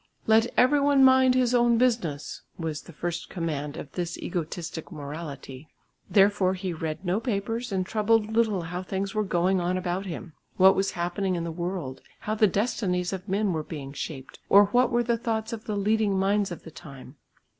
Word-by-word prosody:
"Let 220 Hz, +1 st, +4 dB
every 285 Hz, +4 st, +5 dB
one 280 Hz, -1 st, +4 dB
mind 260 Hz, -1 st, +6 dB
his 250 Hz, -1 st, +2 dB
own 240 Hz, -1 st, +4 dB
business" 225 Hz, -, 0 dB, 0.2 s
was 160 Hz, -3 st, -4 dB
the -, -, -13 dB
first 170 Hz, +2 st, -4 dB
command 150 Hz, -5 st, -4 dB
of 140 Hz, -, -8 dB
this 175 Hz, -2 st, -4 dB
egotistic 170 Hz, -1 st, -5 dB
morality. 145 Hz, -2 st, -8 dB, 0.4 s
Therefore 195 Hz, -2 st, +4 dB
he 185 Hz, -1 st, -4 dB
read 160 Hz, +3 st, -5 dB
no 180 Hz, +4 st, +1 dB
papers 225 Hz, +1 st, -3 dB
and 185 Hz, -1 st, 0 dB
troubled 220 Hz, +1 st, +1 dB
little 220 Hz, -5 st, +2 dB
how 175 Hz, +2 st, -4 dB
things 195 Hz, +1 st, -3 dB
were 215 Hz, -, +1 dB
going 185 Hz, 0 st, +1 dB
on 180 Hz, +1 st, 0 dB
about 185 Hz, +1 st, -3 dB
him, 175 Hz, -1 st, -7 dB, 0.2 s
what 190 Hz, +1 st, +7 dB
was 195 Hz, 0 st, 0 dB
happening 180 Hz, +2 st, -1 dB
in 170 Hz, -, -2 dB
the 170 Hz, -, -3 dB
world, 170 Hz, -5 st, -4 dB, 0.2 s
how 215 Hz, -, -2 dB
the 215 Hz, 0 st, +4 dB
destinies 190 Hz, -3 st, -1 dB
of 190 Hz, +1 st, -6 dB
men 200 Hz, 0 st, +1 dB
were 160 Hz, -, -1 dB
being 145 Hz, -3 st, -7 dB
shaped, 135 Hz, -2 st, -7 dB
or 200 Hz, +1 st, +8 dB
what 245 Hz, +1 st, +4 dB
were 240 Hz, 0 st, +1 dB
the 235 Hz, -1 st, 0 dB
thoughts 225 Hz, -1 st, -2 dB
of 225 Hz, 0 st, -7 dB
the 210 Hz, -2 st, -2 dB
leading 210 Hz, -1 st, +1 dB
minds 200 Hz, +1 st, +1 dB
of 175 Hz, -, -8 dB
the 160 Hz, -, -11 dB
time. 135 Hz, -2 st, -12 dB
190 Hz, 190 wpm, -26 LUFS, 170-220 Hz, 0.4 s, or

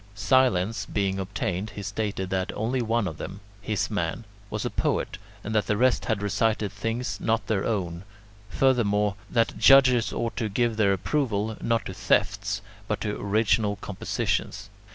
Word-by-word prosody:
Silence 110 Hz, -3 st, +2 dB
being 95 Hz, -1 st, -1 dB
obtained, 95 Hz, +1 st, -3 dB
he 100 Hz, -, -5 dB
stated 100 Hz, -1 st, -3 dB
that 95 Hz, 0 st, -1 dB
only 120 Hz, +4 st, 0 dB
one 115 Hz, -2 st, +1 dB
of 80 Hz, -3 st, -6 dB
them 100 Hz, -, -6 dB, 0.2 s
his 105 Hz, 0 st, -1 dB
man 110 Hz, +2 st, -2 dB, 0.2 s
was 105 Hz, -1 st, -3 dB
a -, -, 0 dB
poet, -, -, -1 dB, 0.2 s
and 110 Hz, -, -4 dB
that 105 Hz, -2 st, +1 dB
the 105 Hz, -, +1 dB
rest 125 Hz, +2 st, +3 dB
had 110 Hz, -3 st, -1 dB
recited 105 Hz, +1 st, +1 dB
things 110 Hz, 0 st, -3 dB
not 115 Hz, +1 st, +1 dB
their 105 Hz, -4 st, 0 dB
own; 90 Hz, -6 st, -2 dB, 0.5 s
furthermore, 105 Hz, -6 st, +2 dB, 0.2 s
that 115 Hz, -1 st, +1 dB
judges 130 Hz, -4 st, +6 dB
ought 115 Hz, 0 st, -2 dB
to 110 Hz, -3 st, -1 dB
give 115 Hz, +2 st, +1 dB
their 105 Hz, -3 st, +3 dB
approval, 110 Hz, 0 st, 0 dB
not 115 Hz, -1 st, 0 dB
to 95 Hz, -, -5 dB
thefts, 100 Hz, +1 st, 0 dB, 0.2 s
but 105 Hz, -, -1 dB
to 105 Hz, -1 st, -2 dB
original 105 Hz, 0 st, +2 dB
compositions. 100 Hz, 0 st, -3 dB
105 Hz, 160 wpm, -26 LUFS, 100-115 Hz, 0.5 s, judges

